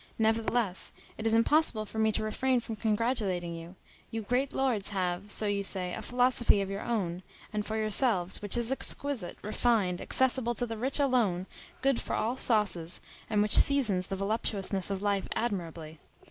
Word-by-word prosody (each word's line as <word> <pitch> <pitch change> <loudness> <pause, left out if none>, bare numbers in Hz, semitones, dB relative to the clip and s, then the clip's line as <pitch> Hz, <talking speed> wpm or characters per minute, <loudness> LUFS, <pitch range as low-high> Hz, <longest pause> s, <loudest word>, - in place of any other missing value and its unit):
Nevertheless, 225 -2 0 0.3
it 225 - -1
is 225 - +2
impossible 230 -2 +3
for 220 - -6
me 220 0 +3
to 220 - -1
refrain 255 +4 0
from 230 -1 -6
congratulating 210 -5 -1
you. 165 +2 -9 0.3
You 225 0 -4
great 250 +5 0
lords 245 -7 0
have, 185 0 -2
so 215 - 0
you 205 -1 0
say, 185 -2 -1
a - - -5
philosophy 245 -1 +2
of 195 0 -3
your 200 +1 -4
own, 190 -8 -2 0.3
and 210 0 -1
for 220 +1 -4
yourselves, 215 -4 +1
which 205 +3 -2
is 235 +1 +2
exquisite, 270 -6 -1
refined, 210 -4 0
accessible 255 -2 +1
to 245 - +1
the 225 -1 -5
rich 255 +6 -1
alone, 235 -10 +1 0.4
good 275 -2 +2
for - - -3
all 235 +3 -1
sauces, 205 -9 +1 0.3
and 210 -2 +2
which 210 - +4
seasons 215 -10 +5
the 195 - -3
voluptuousness 195 -1 0
of 195 0 -3
life 200 -2 0
admirably. 165 -8 -4
215 Hz, 175 wpm, -29 LUFS, 195-240 Hz, 0.4 s, seasons